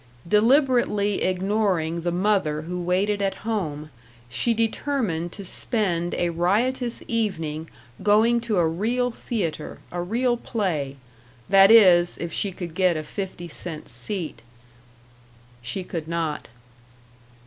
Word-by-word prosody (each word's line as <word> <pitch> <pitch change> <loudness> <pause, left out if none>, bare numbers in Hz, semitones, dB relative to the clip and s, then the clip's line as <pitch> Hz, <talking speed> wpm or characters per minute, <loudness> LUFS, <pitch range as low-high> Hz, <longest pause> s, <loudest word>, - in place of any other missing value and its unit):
Deliberately 225 - +3
ignoring 185 -3 0
the 175 +1 -1
mother 180 -5 +1
who 180 +2 -4
waited 195 +4 +1
at 195 -1 0
home, 155 -9 -3 0.4
she 125 - +1
determined 225 - -1
to 200 - -8
spend 175 -4 -1
a 175 -1 0
riotous 230 +9 0
evening 165 -9 -2 0.3
going 225 +3 +4
to 225 -4 -1
a 170 -2 +3
real 235 +9 0
theater, 180 -10 -4
a 175 - -3
real 240 +7 0
play. 170 - -2 0.5
That 195 0 +7
is, 180 -6 +6
if 170 -2 -5
she 200 - 0
could 175 -2 -7
get 180 -2 +2
a 155 - -3
fifty 185 0 -6
cent 165 -1 -7
seat. 155 - -4 1.2
She 125 +11 -3
could 165 -3 -5
not. 165 -2 -2
185 Hz, 125 wpm, -24 LUFS, 170-220 Hz, 1.2 s, That